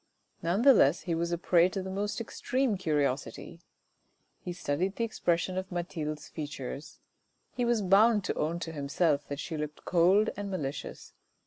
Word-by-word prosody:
None 180 Hz, +7 st, 0 dB
the 275 Hz, 0 st, +9 dB
less 155 Hz, -, +4 dB
he 175 Hz, -, -2 dB
was 170 Hz, +1 st, -1 dB
a 170 Hz, -, 0 dB
prey 175 Hz, +1 st, +4 dB
to 190 Hz, 0 st, -4 dB
the 190 Hz, -, -5 dB
most 205 Hz, +3 st, -2 dB
extreme 245 Hz, +1 st, -1 dB
curiosity; 150 Hz, 0 st, -2 dB, 0.8 s
he 180 Hz, -, -6 dB
studied 180 Hz, +2 st, -2 dB
the 230 Hz, -, -1 dB
expression 185 Hz, -4 st, 0 dB
of 190 Hz, 0 st, -8 dB
Mathilde's 160 Hz, -4 st, -4 dB
features; 145 Hz, -1 st, -7 dB, 0.6 s
he 245 Hz, -, -1 dB
was 235 Hz, -3 st, +2 dB
bound 210 Hz, +3 st, +5 dB
to -, -, -1 dB
own 160 Hz, +3 st, -1 dB
to 165 Hz, -, -4 dB
himself 145 Hz, 0 st, 0 dB
that 145 Hz, 0 st, -5 dB
she 160 Hz, -1 st, -4 dB
looked 150 Hz, 0 st, -6 dB
cold 185 Hz, +5 st, +4 dB
and 200 Hz, 0 st, -5 dB
malicious. 145 Hz, -7 st, -5 dB
175 Hz, 165 wpm, -30 LUFS, 150-195 Hz, 0.8 s, the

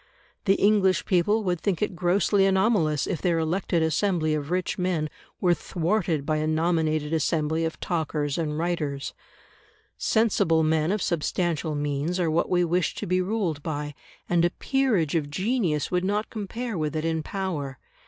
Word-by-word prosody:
The 195 Hz, -, +4 dB
English 200 Hz, -3 st, +3 dB
people 205 Hz, +4 st, +2 dB
would 175 Hz, -3 st, -1 dB
think 195 Hz, -5 st, 0 dB
it 210 Hz, -3 st, -1 dB
grossly 195 Hz, +3 st, +2 dB
anomalous 190 Hz, -7 st, +2 dB
if 175 Hz, -, -3 dB
their 175 Hz, -2 st, +2 dB
elected 165 Hz, +1 st, 0 dB
assembly 160 Hz, 0 st, +1 dB
of 150 Hz, -1 st, -3 dB
rich 180 Hz, +1 st, -1 dB
men 175 Hz, -4 st, 0 dB, 0.3 s
were 180 Hz, -2 st, +3 dB
thwarted 170 Hz, -4 st, -1 dB
by 155 Hz, 0 st, +1 dB
a 155 Hz, 0 st, -1 dB
nominated 155 Hz, -1 st, +1 dB
assembly 160 Hz, 0 st, +1 dB
of 165 Hz, -, -4 dB
talkers 150 Hz, -4 st, -1 dB
and 150 Hz, -3 st, -2 dB
writers. 155 Hz, -5 st, -2 dB, 0.9 s
Sensible 195 Hz, -8 st, +2 dB
men 155 Hz, +1 st, +2 dB
of 210 Hz, -2 st, 0 dB
substantial 165 Hz, -1 st, -1 dB
means 145 Hz, +4 st, -1 dB
are 170 Hz, -3 st, +1 dB
what 165 Hz, +2 st, +1 dB
we 175 Hz, -1 st, +3 dB
wish 175 Hz, +1 st, 0 dB
to -, -, -4 dB
be 185 Hz, +1 st, +1 dB
ruled 185 Hz, -6 st, -1 dB
by, 150 Hz, -1 st, -4 dB, 0.3 s
and 175 Hz, -1 st, +2 dB
a 175 Hz, -, +4 dB
peerage 230 Hz, -, 0 dB
of 155 Hz, -4 st, 0 dB
genius 185 Hz, -, 0 dB
would 180 Hz, 0 st, +1 dB
not 205 Hz, +3 st, -1 dB
compare 220 Hz, 0 st, -4 dB
with 155 Hz, 0 st, -2 dB
it 155 Hz, +1 st, -1 dB
in 160 Hz, -1 st, 0 dB
power. 155 Hz, -8 st, -4 dB
170 Hz, 165 wpm, -26 LUFS, 155-190 Hz, 0.9 s, The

